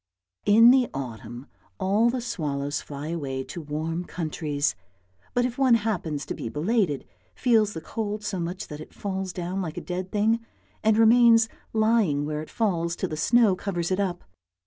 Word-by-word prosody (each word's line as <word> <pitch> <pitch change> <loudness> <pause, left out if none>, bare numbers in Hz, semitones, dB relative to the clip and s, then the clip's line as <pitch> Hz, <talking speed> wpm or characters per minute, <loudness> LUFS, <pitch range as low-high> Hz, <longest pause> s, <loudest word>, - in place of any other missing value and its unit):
In 225 +4 +8
the 255 -2 +4
autumn 120 -1 -6 0.3
all 205 +5 +3
the 250 +1 -2
swallows 145 -9 -2
fly 145 +1 -7
away 135 -5 -3
to 170 - -7
warm 160 +3 -3
countries, 155 -4 -2 0.6
but 245 0 +3
if 250 +1 -4
one 260 -3 +5
happens 175 -10 -2
to - - -4
be 115 - -5
belated, 165 - 0 0.3
feels 220 -4 +3
the 160 - -6
cold 210 +1 -4
so 195 -3 -3
much 175 +3 -4
that 150 0 -7
it - - -12
falls 190 -2 -3
down 180 +2 -3
like 160 -4 -5
a - - 0
dead 180 +1 -4
thing, 220 +2 +2 0.4
and 215 0 +4
remains 230 0 +6 0.2
lying 215 -10 +2
where 150 0 -3
it 155 - -9
falls 170 -6 0
till - - -3
the 155 - -3
snow 220 +4 +4
covers 180 -2 -3
it 185 - +1
up. 180 -3 -1
185 Hz, 175 wpm, -26 LUFS, 155-220 Hz, 0.6 s, In